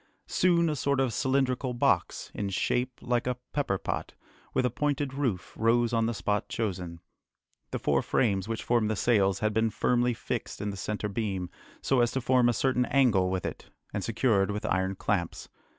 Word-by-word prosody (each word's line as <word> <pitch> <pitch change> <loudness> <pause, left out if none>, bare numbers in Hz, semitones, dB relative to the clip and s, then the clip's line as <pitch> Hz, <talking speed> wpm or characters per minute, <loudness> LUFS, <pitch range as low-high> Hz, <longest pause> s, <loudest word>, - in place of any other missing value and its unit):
Soon 170 -2 +3
a 155 - 0
sort 140 0 0
of 130 -4 +1
cylindrical 130 -1 0
box, 120 - +1
in 100 -1 -3
shape 125 +6 -1
like 120 0 0
a 125 -1 -1 0.2
pepperpot, 135 -10 -2 0.4
with 125 - +1
a 125 - +1
pointed 145 +1 -1
roof, 125 -10 -2
rose 120 +1 +2
on 115 -1 +2
the 120 - -1
spot 105 0 -1
chosen. 90 -6 -3 0.7
The - - -2
four - - +1
frames 100 -5 +1
which 115 0 -3
formed 115 -3 +2
the 110 - 0
sails 100 -4 +2
had 110 0 +1
been 110 +1 +2
firmly 120 +2 +1
fixed - - -4
in 105 0 -2
the - - -6
centre 105 +3 -3
beam, 100 -4 -3 0.3
so 135 - +2
as 120 - +3
to 135 - 0
form 125 -1 +4
a - - +2
certain 125 0 +1
angle 110 -10 +3
with 95 -2 -2
it, - - -6 0.2
and 100 - -2
secured 110 -4 +2
with 105 0 -3
iron 95 0 0
clamps. 90 -3 -2
115 Hz, 185 wpm, -28 LUFS, 100-125 Hz, 0.7 s, form